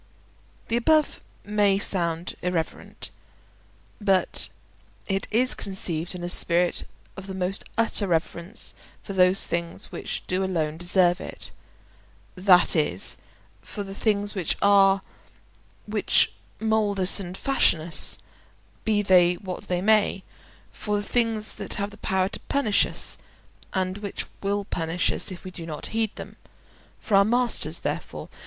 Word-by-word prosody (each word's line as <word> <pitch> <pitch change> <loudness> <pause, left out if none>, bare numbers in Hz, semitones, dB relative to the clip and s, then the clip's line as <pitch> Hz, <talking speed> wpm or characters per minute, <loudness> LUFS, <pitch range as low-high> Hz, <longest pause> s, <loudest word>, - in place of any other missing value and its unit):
The 230 - +2
above 310 +5 +2 0.2
may 205 -1 +2
sound 170 -3 0
irreverent, 175 -3 -4 0.9
but 195 -3 +3 0.6
it 195 0 -2
is 250 +4 +2
conceived 180 -3 -3
in 175 - -7
a - - -2
spirit 175 0 +2 0.3
of 190 0 -9
the 190 - -6
most 190 +1 -2
utter 225 -3 +1
reverence 170 0 -2 0.3
for 200 - -6
those 185 0 +4
things 170 0 -4
which - - -5
do 185 +1 -1
alone 160 -5 -1
deserve 175 0 +2
it—that 180 -2 0
is, 125 - 0 0.4
for 205 - -6
the 195 0 -8
things 205 0 0
which 185 -6 -1
are, 195 -1 +5 0.8
which - - +2 0.3
mould 220 -2 +1
us 185 +2 +6
and 185 -1 -6
fashion 270 -11 +3
us, 160 +1 +2 0.7
be 210 -2 +1
they 180 -2 +5
what 185 0 -7
they 180 0 -1
may; 210 -2 +3 0.5
for 210 -1 -2
the 205 - -2
things 225 -3 0
that - - 0
have 200 0 -3
power 190 -1 +1
to - - -7
punish 235 -8 +3
us, - - -2 0.5
and 185 +1 -2
which 205 -1 -4 0.2
will 200 0 -1
punish 165 -1 -1
us - - -2
if 180 - -9
we 185 - -8
do 170 -2 -8
not 155 -2 -6
heed 225 -1 +1
them; - - -9 0.6
for 210 - 0
our 195 - +7
masters 240 +3 +1
therefore. - - -4
190 Hz, 140 wpm, -25 LUFS, 175-205 Hz, 0.9 s, our